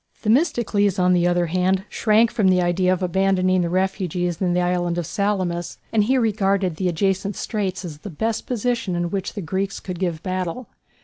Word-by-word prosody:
Themistocles, 215 - +2
on 180 0 +3
the 175 -1 +3
other 175 0 +2
hand, 185 +3 +1
shrank 220 +1 +3
from 215 -5 +1
the 185 -1 +4
idea 180 +1 +2
of 185 0 0
abandoning 185 0 +2
the 170 - -1
refugees 180 -2 -1
in 180 -2 +1
the - - +2
island 175 -1 0
of 175 - -2
Salamis, 185 -3 -2 0.2
and 215 -2 +3
he 260 +4 +2
regarded 200 -6 +1
the 185 - 0
adjacent 195 +3 0
straits 195 -4 -3
as 150 -4 -8
the 205 - -8
best 220 +7 -2
position 235 -5 -1
in 175 0 -2
which 195 -2 -3
the 205 - -3
Greeks 195 +4 -2
could 180 -3 -6
give 175 -4 -2
battle. 185 +5 -3
185 Hz, 190 wpm, -22 LUFS, 175-205 Hz, 0.2 s, the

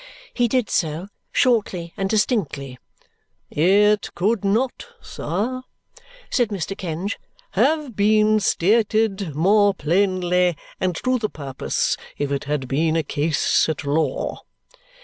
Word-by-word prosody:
He 245 -1 +2
did 245 -1 +1
so 165 +3 -1 0.2
shortly 195 -9 +1
and 195 0 -2
distinctly. 150 - -1 0.7
"It 205 +5 +3
could 210 +4 0
not, 230 - 0
sir," 240 - -3 0.7
said 245 -2 +2
Mr. 195 -2 -3
Kenge, 185 +2 -4 0.3
"have 300 -7 +1
been 215 +1 +4
stated 210 -3 +1
more 200 +5 +4
plainly 180 0 +1 0.2
and 185 -2 0
to 255 0 +1
the 215 -2 -1
purpose 135 -3 -2 0.2
if 145 -1 -2
it 140 0 -2
had 145 -3 -2
been 155 +5 +1
a 165 - +1
case 150 +2 +1
at 160 0 -3
law." 150 +3 -1
195 Hz, 120 wpm, -22 LUFS, 160-215 Hz, 0.7 s, been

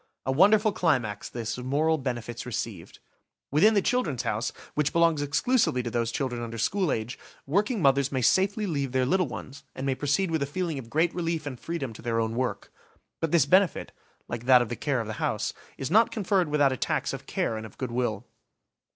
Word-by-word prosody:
A 130 - +1
wonderful 210 - +5
climax, 125 - 0
this, 115 0 -4
of 125 - -7
moral 155 +4 +2
benefits 120 -3 -4
received! 110 -7 -5 0.5
Within 210 +10 +5
the 200 - +3
"Children's 160 - 0
House", 110 +3 -1 0.2
which 150 -1 +1
belongs 165 -3 +3
exclusively 145 - +1
to 120 - -4
those 115 -1 0
children 125 -2 -2
under 115 -1 -5
school 185 - +1
age, 110 +3 -3 0.3
working 200 - 0
mothers 140 0 +3
may 130 -2 -1
safely 195 - +2
leave 140 -8 -2
their 130 -1 +2
little 180 +4 +2
ones, 135 +2 -8
and 130 - -4
may 135 - +1
proceed 150 +7 0
with 160 -2 0
a 140 - 0
feeling 165 -1 -3
of 115 -3 -10
great 160 +6 +1
relief 165 -2 -2
and 130 -4 -6
freedom 165 -8 -4
to - - -12
their 115 -1 -1
own 110 0 -1
work. 125 +1 -3 0.5
But 165 - -1
this 170 - +4
benefit, 185 0 +2 0.4
like 120 0 -5
that 125 -2 +7
of 120 - -7
the 120 - -3
care 135 -2 -1
of - - -5
the 110 - -4
house, - - -1 0.2
is 135 - -4
not 225 +4 +5
conferred 195 -6 0
without 145 -2 +3
a - - -4
tax - - -1
of - - -7
care 110 - -1
and 110 - -5
of 110 - -11
good 130 -3 -4
will. 120 -4 -1
140 Hz, 210 wpm, -27 LUFS, 120-170 Hz, 0.5 s, that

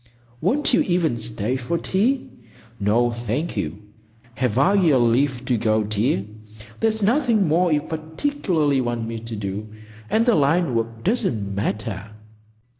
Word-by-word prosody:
"Won't 260 - +1
you - - +5
even 170 -9 +1
stay 110 +2 -2
for 130 +7 -2
tea? 235 +11 0 0.5
"No, 115 +4 +2
thank 120 +7 -3
you. 100 0 -4 0.5
Have 125 -2 -1
I 175 +9 +4
your 170 -9 +4
leave 125 +2 +2
to 125 -2 +1
go, 110 -1 +2
dear? 105 -1 0 0.5
There's 220 -1 0
nothing 230 - +3
more 170 +3 +2
you 150 -1 +2
particularly 160 - -1
want 120 -2 -2
me 115 0 -4
to 115 0 -7
do, 100 +1 -5 0.4
and 225 +1 +2
the 240 - +4
line 160 -1 +2
work 115 0 -2
doesn't 135 - 0
matter." 105 0 -3
130 Hz, 145 wpm, -22 LUFS, 110-180 Hz, 0.5 s, you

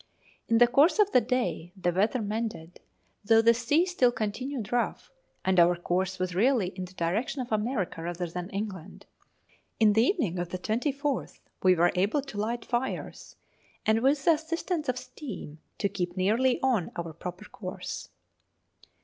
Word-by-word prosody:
In 230 - +3
the 240 - +8
course 280 - +4
of 415 -1 +4
the 250 - +5
day 240 -10 -2
the 175 -1 +1
weather 215 +6 +1
mended, 210 -6 -4 0.4
though 225 +2 +5
the 230 +1 +6
sea 295 +8 +2
still 310 -10 +3
continued 235 +1 -4
rough, 245 - -1 0.3
and 190 -1 +3
our 175 +1 +6
course 185 +2 -1
was 185 -1 -2
really 220 0 +2
in 185 -1 -6
the 180 - -14
direction 190 +11 -1
of 250 -2 -4
America 210 -6 -1
rather 175 +1 -3
than 175 +2 -5
England. 195 -3 -6 0.7
In 215 -2 +5
the 220 - +4
evening 240 - 0
of 175 -1 -3
the 185 - -3
24th 275 - -2 0.2
we 185 -1 +5
were 175 +1 +4
able 205 +10 +1
to 240 -7 -7
light 230 +3 -2
fires, 250 +2 -3 0.5
and, 220 +1 +3
with 275 +2 +2
the 335 - +7
assistance 320 0 -2
of 255 - 0
steam, 245 - -8 0.2
to 200 - +1
keep 180 -2 -4
nearly 230 +7 +2
on 245 -10 +2
our 170 -2 -5
proper 180 +5 -7
course. 185 -3 -7
215 Hz, 165 wpm, -28 LUFS, 180-255 Hz, 0.7 s, the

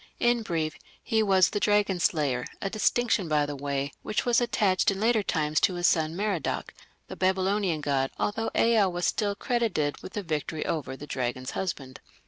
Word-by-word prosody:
In 240 0 +3
brief, 165 -6 -2 0.3
he 220 -1 +1
was 190 -4 +4
the 205 - -1
dragon 205 -3 +2
slayer, 140 -8 +1
a 195 - -3
distinction, 220 -2 +1
by 150 -1 +2
the 145 0 -5
way, 140 0 -3
which 210 - -2
was 240 0 +3
attached 205 -6 +2
in 195 -1 -2
later 225 +1 +3
times 155 -5 0
to 185 - +2
his 175 0 -1
son 160 -1 +2
Merodach, 195 -6 -2 0.3
the - - -7
Babylonian 190 -2 +1
god, 135 -2 0
although 225 +2 -1
Ea 225 -4 +4
was 175 -1 -2
still 205 -2 0
credited 205 - -1
with - - -9
the 205 - -3
victory 155 -1 -3
over 145 -4 -3
the 150 - -8
dragon's 130 -2 -3
husband. 140 -9 -4
185 Hz, 180 wpm, -27 LUFS, 150-210 Hz, 0.3 s, was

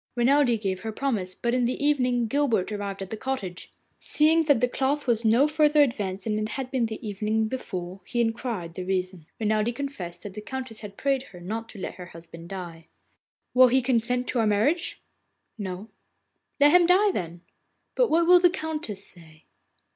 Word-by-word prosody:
Renelde 245 -1 +3
gave 190 -3 -2
her 220 +3 -5
promise, 215 -7 -2
but 235 0 -1
in 250 -1 +2
the 250 - 0
evening 255 -5 +2
Guilbert 225 -6 +1
arrived 200 -2 -4
at 190 - -9
the 220 - -4
cottage. 210 -9 -5 0.3
Seeing 320 +2 +4
that 285 -5 +4
the 250 - +3
cloth 275 +4 -1
was 235 -2 +1
no 230 +6 +4
farther 300 -1 +4
advanced 200 -7 -2
than 215 -1 -1
it 215 0 -2
was 260 -1 -5 0.2
the 220 0 -7
evening 215 +2 0
before, 185 -6 -5
he 240 - -2
inquired 225 -7 -2
the 185 - -5
reason. 185 -3 -3
Renelde 215 +2 +1
confessed 185 -11 -6
that 205 - -7
the 210 - -7
Countess 255 0 -6
had 205 -2 -10
prayed 275 -1 +1
her 180 -8 -13
not 220 +6 -5
to 210 - -11
let - - -6
her 180 - -8
husband 165 0 -12
die. 170 -4 -8 0.7
'Will 255 0 +7
he 255 +2 +3
consent 245 0 0
to 250 - 0
our 225 - +2
marriage?' 260 - +1 0.6
'No.' 190 +1 -5 0.7
'Let 290 +1 +6
him 355 0 +6
die 390 +3 +5
then.' 170 - -5 0.5
'But - - +2
what 335 +1 +3
will 360 +1 +7
the 355 0 +5
Countess 310 - -4
say? 160 -3 -16
225 Hz, 185 wpm, -26 LUFS, 195-270 Hz, 0.7 s, Will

